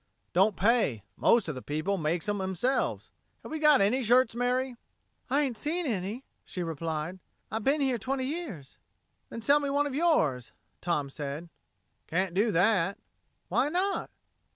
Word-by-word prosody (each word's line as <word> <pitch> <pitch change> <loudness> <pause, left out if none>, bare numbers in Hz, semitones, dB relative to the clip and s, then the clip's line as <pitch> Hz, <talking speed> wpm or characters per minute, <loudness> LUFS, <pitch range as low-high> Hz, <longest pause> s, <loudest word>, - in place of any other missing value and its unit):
"Don't 195 +3 +4
pay. 205 - +2
Most 230 -5 +3
of 155 - -2
the 130 - -7
people 155 +9 -1
makes 165 +2 -1
'em 205 -1 -1
'emselves. 190 +8 -1 0.3
Have - - -9
we 315 - -3
got 300 -4 +6
any 225 +7 +3
shirts, 245 +1 +4
Mary?" 250 +1 0 0.5
"I 280 +3 +3
ain't 265 -5 -1
never - - -11
seen 340 +4 -1
any," 215 +1 -3 0.2
she 180 - -5
replied. 165 +2 -4 0.3
"I 220 - -1
bin 275 +7 +1
here 260 -4 +1
twenty 260 +4 -2
years." 260 - -6 0.5
"Then 230 - -7
sell 285 +4 +5
me 285 -1 -2
one 285 +1 +2
of 285 - -3
yours," 210 - +1 0.3
Tom 150 -6 -1
said. 145 +4 -5 0.6
"Can't 180 +1 0
do 210 +4 +2
that." 195 0 +3 0.5
"Why 285 - +1
not?" 375 +5 0
220 Hz, 165 wpm, -29 LUFS, 170-270 Hz, 0.6 s, got